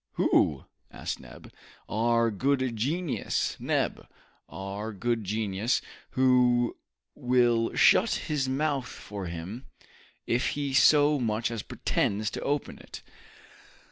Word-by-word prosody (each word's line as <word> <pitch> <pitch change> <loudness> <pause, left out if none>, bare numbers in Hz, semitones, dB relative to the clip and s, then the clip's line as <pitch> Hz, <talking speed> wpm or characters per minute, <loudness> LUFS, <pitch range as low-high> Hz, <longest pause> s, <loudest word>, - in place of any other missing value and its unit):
"Who?" 70 -3 +2 0.2
asked - - -5
Neb. - - -13 0.3
"Our 115 +1 +2
good 130 +2 0
genius, 150 +8 -1
Neb, - - -1 0.4
our 100 +3 -6
good 115 +2 -1
genius, 105 +2 0 0.4
who 125 -2 +3 0.4
will 120 -2 +2
shut - - +5
his 140 -4 -2
mouth 135 -1 -1
for 100 -3 -7
him, 85 +9 -7 0.6
if 120 +2 +1
he 140 -2 -2
so 145 +2 +5
much 115 -1 -1
as 115 -2 -3
pretends 105 +2 -1
to - - -5
open 145 0 -2
it!" - - -11
120 Hz, 110 wpm, -28 LUFS, 105-130 Hz, 0.6 s, shut